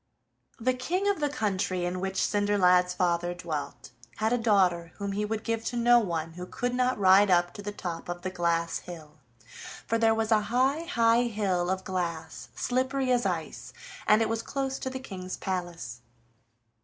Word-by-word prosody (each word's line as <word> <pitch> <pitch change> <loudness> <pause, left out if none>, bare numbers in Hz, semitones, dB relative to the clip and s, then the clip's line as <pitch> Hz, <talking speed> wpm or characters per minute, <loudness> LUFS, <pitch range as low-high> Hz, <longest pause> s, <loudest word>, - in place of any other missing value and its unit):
The 255 +3 +1
King 350 +11 -1
of 405 -3 +1
the 295 -1 +1
country 195 -7 -1
in 180 +1 -2
which 190 +1 -3
Cinderlad's 180 -3 +3
father 175 -1 0
dwelt 165 -5 -5 0.2
had 220 +2 0
a - - +3
daughter 185 -7 +2
whom 200 -1 -4
he 210 +2 -1
would 220 +1 -3
give 230 -1 -2
to 245 - -2
no 240 0 +6
one 165 -6 -2
who 180 +2 -8
could 245 +5 -2
not 250 0 +1
ride 195 +1 +6
up 175 -1 +3
to - - -8
the 205 +1 -4
top 175 -4 -6
of 175 0 -5
the 185 - -3
glass 170 -2 0
hill, 155 -3 -11 0.7
for 230 - 0
there 225 -1 +4
was 220 0 -1
a 215 -1 +5
high, 265 +7 +1
high 235 -6 +3
hill 190 -5 0
of 190 0 -1
glass, 170 -4 -4
slippery 260 +1 0
as 240 -4 +2
ice, 165 -4 -4 0.3
and 215 +1 +5
it - - 0
was 225 0 -1
close 270 +1 -3
to 260 - -3
the 260 - -5
King's 185 -8 -7
palace. 175 -3 -4
200 Hz, 185 wpm, -28 LUFS, 175-235 Hz, 0.7 s, no